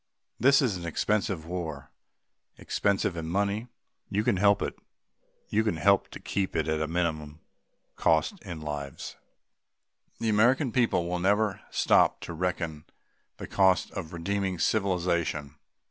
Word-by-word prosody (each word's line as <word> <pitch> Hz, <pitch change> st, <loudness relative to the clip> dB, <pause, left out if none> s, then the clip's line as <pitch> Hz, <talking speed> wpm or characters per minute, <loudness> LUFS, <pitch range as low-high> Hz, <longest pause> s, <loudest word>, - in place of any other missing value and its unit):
This 140 Hz, +4 st, +5 dB
is 110 Hz, -8 st, 0 dB
an 85 Hz, -, -7 dB
expensive 95 Hz, 0 st, 0 dB
war 80 Hz, -5 st, -5 dB, 0.7 s
expensive 100 Hz, -3 st, 0 dB
in 80 Hz, -1 st, -4 dB
money; 100 Hz, +6 st, -1 dB, 0.4 s
you 105 Hz, +2 st, 0 dB
can 100 Hz, -, +2 dB
help 100 Hz, +1 st, +4 dB
it -, -, -3 dB, 0.7 s
you 110 Hz, +1 st, +2 dB
can 105 Hz, -7 st, -1 dB
help 100 Hz, +5 st, +3 dB
to -, -, -9 dB
keep 95 Hz, -1 st, -2 dB
it 80 Hz, -, 0 dB
at 80 Hz, 0 st, 0 dB
a 80 Hz, -, 0 dB
minimum 80 Hz, -3 st, -2 dB, 0.6 s
cost 80 Hz, -, +2 dB
in 85 Hz, -6 st, -7 dB
lives. 75 Hz, -3 st, -6 dB, 1.0 s
The 115 Hz, -, -2 dB
American 120 Hz, +5 st, +3 dB
people 110 Hz, -8 st, +1 dB
will 90 Hz, 0 st, -1 dB
never 105 Hz, +2 st, +1 dB
stop -, -, +3 dB
to 85 Hz, -, -6 dB
reckon 80 Hz, -3 st, -3 dB, 0.5 s
the -, -, -6 dB
cost 95 Hz, -2 st, +2 dB
of 90 Hz, -5 st, -6 dB
redeeming 95 Hz, +2 st, -2 dB
civilization. 85 Hz, -6 st, 0 dB
90 Hz, 140 wpm, -28 LUFS, 80-100 Hz, 1.0 s, This